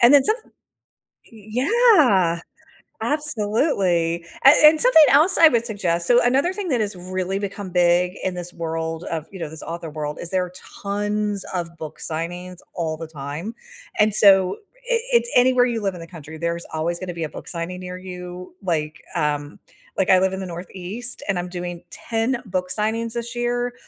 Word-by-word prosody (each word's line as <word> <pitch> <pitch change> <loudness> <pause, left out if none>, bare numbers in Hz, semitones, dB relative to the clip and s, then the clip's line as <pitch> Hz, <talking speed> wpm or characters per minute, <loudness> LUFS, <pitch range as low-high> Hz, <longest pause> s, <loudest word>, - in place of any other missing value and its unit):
and 240 +3 +7
then 280 - +7
somet 440 - -1 0.8
Y 220 +4 -4
Y - - -1 0.3
Yeah, 185 - +4 0.6
absolutely. 205 - 0 0.2
A - - +11 0.2
And 310 0 +5
something 480 -11 +7
else 310 +8 +5
I 330 - +9
would 235 -2 +1
suggest, 175 -6 -1
so 245 0 +5
another 275 +9 +2
thing 400 -2 -4
that 245 -6 +1
has 205 -2 -2
really 185 +1 -3
become 200 -1 -5
big 180 +1 +3
in 185 -1 -2
this 175 0 -6
world 165 0 -4
of, 160 -2 -4
you 190 - -9
know, 165 -3 -4
this 160 -1 -9
author 170 0 -6
world 150 -1 -5
is 170 - -6
there 185 -1 0
are 180 - -12 0.3
tons 205 0 -1
of 170 -2 -4
book 155 -1 -8
signings 175 +3 -4 0.2
all 160 -2 -3
the 165 0 -7
time, 155 +8 -6 0.4
and 210 -1 +4
so, 195 -3 +5 0.3
i 465 - +3
it's 475 0 +3
anywhere 250 0 +5
you 230 -3 -2
live 195 -2 -1
in - - -9
the 165 - -9
country, 160 -2 -10
there's 170 +1 -2
always 165 +2 -1
gonna 180 -2 -5
be 165 -1 -4
a 150 - -6
book - - -10
signing 175 +1 -4
near 180 0 -7
you, 180 -1 -9
like, 155 -4 -2
um 145 -2 -2 0.4
Like, 190 - +1
I 185 - +7
live 190 0 +2
in 190 - -4
the 190 - -4
Northeast, 185 +7 -2
and 195 -3 0
I'm 175 0 -4
doing 175 -1 -6
10 230 +3 -2
book 180 -2 -3
signings 225 +3 -1
this 235 0 -5
year, 245 0 -1
185 Hz, 190 wpm, -22 LUFS, 170-225 Hz, 0.8 s, A